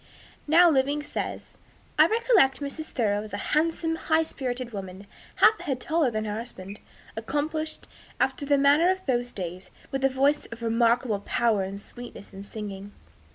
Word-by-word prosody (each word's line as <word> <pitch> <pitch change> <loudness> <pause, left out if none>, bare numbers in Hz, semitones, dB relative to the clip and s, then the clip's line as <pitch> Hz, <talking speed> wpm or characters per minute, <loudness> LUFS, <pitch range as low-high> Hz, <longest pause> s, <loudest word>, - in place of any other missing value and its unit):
now 340 +4 +7
living, 290 -1 +2
says, - - -6 0.4
"I 310 - +8
recollect 440 - +3
Mrs. 295 +2 -5
Thoreau 205 -4 0
as 215 0 -10
a - - -1 0.2
handsome, 325 +1 +1
high 320 0 +2
spirited 255 -5 -4
woman, 190 -1 -7 0.3
half 435 - +5
a - - -8
head 270 -4 -1
taller 315 -1 +1
than 215 -1 -3
her 210 0 -3
husband, 200 -4 -9 0.4
accomplished, 305 +7 -3 0.3
after 265 +2 0
the 285 0 +3
manner 285 +5 +5
of 375 0 -1
those 245 -2 0
days, 180 -1 -6 0.2
with 270 -1 -2
a 270 - +5
voice 275 +3 +1
of 230 0 -9
remarkable 230 -1 +2
power 215 0 +1
and 195 +1 -4
sweetness 240 -2 -11
in 195 +1 -8
singing." 205 -1 -7
255 Hz, 165 wpm, -26 LUFS, 210-305 Hz, 0.4 s, I